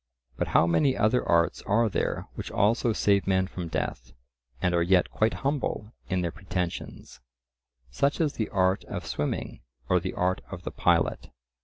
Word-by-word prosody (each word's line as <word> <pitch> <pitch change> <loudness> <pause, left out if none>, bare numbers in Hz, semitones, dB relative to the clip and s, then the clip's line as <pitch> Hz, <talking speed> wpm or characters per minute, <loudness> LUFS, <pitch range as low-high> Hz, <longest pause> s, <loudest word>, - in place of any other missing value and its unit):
But - - -2
how - - +4
many 85 +11 +2
other 110 +4 +2
arts 85 0 +3
are 115 +3 +3
there 105 - -1
which - - -6
also 115 +3 +2
save 100 -2 +2
men 95 -1 +3
from 90 -2 -6
death, 75 -6 -4 0.5
and 90 - +1
are 85 - +3
yet 90 +1 +3
quite 110 +1 +1
humble 130 -6 -1 0.2
in 95 -2 +1
their 85 -1 -1
pretensions—such 90 -9 -5 1.0
as 155 -4 +1
the 110 - -2
art 95 0 +1
of - - -6
swimming, 75 - -3 0.3
or 90 - +4
the 95 +2 -4
art 90 +1 0
of 90 -2 -8
the - - -4
pilot? - - +1
95 Hz, 165 wpm, -27 LUFS, 85-110 Hz, 1.0 s, how